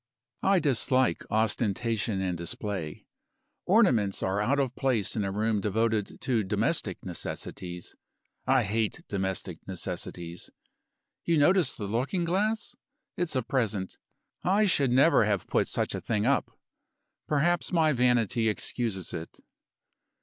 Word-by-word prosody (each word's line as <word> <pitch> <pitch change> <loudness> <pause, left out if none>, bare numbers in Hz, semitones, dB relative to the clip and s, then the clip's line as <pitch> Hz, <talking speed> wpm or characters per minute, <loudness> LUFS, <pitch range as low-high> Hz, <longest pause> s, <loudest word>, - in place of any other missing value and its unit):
I 195 0 +4
dislike 130 -4 +2
ostentation 110 -1 0
and 90 -2 -1
display. 85 -1 -5 0.6
Ornaments 125 - +3
are 95 +2 0
out 135 +7 +2
of 130 -3 0
place 120 -7 0
in 105 - 0
a 95 - -2
room 105 +1 0
devoted 110 +1 0
to 120 -5 +1
domestic 95 - -1
necessities. 90 -1 -6 0.5
I 130 -1 +4
hate 110 +1 -1
domestic 95 -3 -3
necessities. 85 -2 -5 0.7
You 170 -1 +2
notice 175 +4 +4
the 105 - -5
looking 130 - -1
glass? 210 +6 0 0.4
It's 175 -4 -1
a 130 - +1
present. 110 -8 -2 0.4
I 200 +4 +3
should 145 -9 +2
never 130 -1 +5
have 100 -3 0
put - - +1
such - - -1
a - - -4
thing 105 -2 -1
up. 140 +2 +2 0.8
Perhaps 155 +3 +1
my 160 -3 +3
vanity 120 -3 +2
excuses 105 -2 -3
it." 80 -1 -7
115 Hz, 130 wpm, -28 LUFS, 100-140 Hz, 0.8 s, never